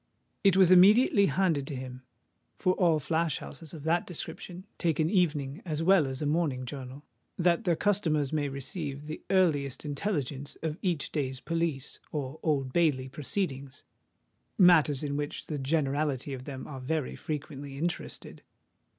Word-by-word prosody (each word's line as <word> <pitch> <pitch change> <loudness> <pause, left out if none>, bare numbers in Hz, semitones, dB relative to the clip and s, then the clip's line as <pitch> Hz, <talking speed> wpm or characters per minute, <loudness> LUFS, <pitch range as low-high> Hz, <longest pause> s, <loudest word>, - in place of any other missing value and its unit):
It 195 -2 +5
was 185 -2 +6
immediately 200 +2 +7
handed 165 -9 +1
to 145 - -4
him; 130 0 -7 0.6
for 185 - +2
all 170 -4 +3
flash 160 0 0
houses 160 -3 -9
of 155 -3 -9
that 165 +2 +1
description 180 +1 -6
take 165 -4 0
an 160 +2 +2
evening 155 -5 +1
as 160 -3 -2
well 180 -4 +5
as 130 +2 -3
a - - -1
morning 145 -4 0
journal, 135 +1 -8 0.3
that 175 +4 +2
their 175 -2 +3
customers 160 -8 +1
may 145 -2 0
receive 140 +1 -5
the 155 +1 -7
earliest 155 -8 +2
intelligence 145 -3 -3
of 160 +1 -3
each 175 -7 -1
day's 130 -4 -2
Police 165 -4 -2
or 145 0 -4
Old 135 -5 0
Bailey 145 -7 +2
proceedings—matters 145 +1 0
in 145 -1 -2
which 145 0 -4
the 150 -2 -4
generality 140 -1 0
of 130 -1 -7
them 135 -3 -6
are 135 -3 -7
very 150 +1 -2
frequently 145 -3 -6
interested. 170 +4 -4
150 Hz, 150 wpm, -29 LUFS, 140-170 Hz, 0.6 s, immediately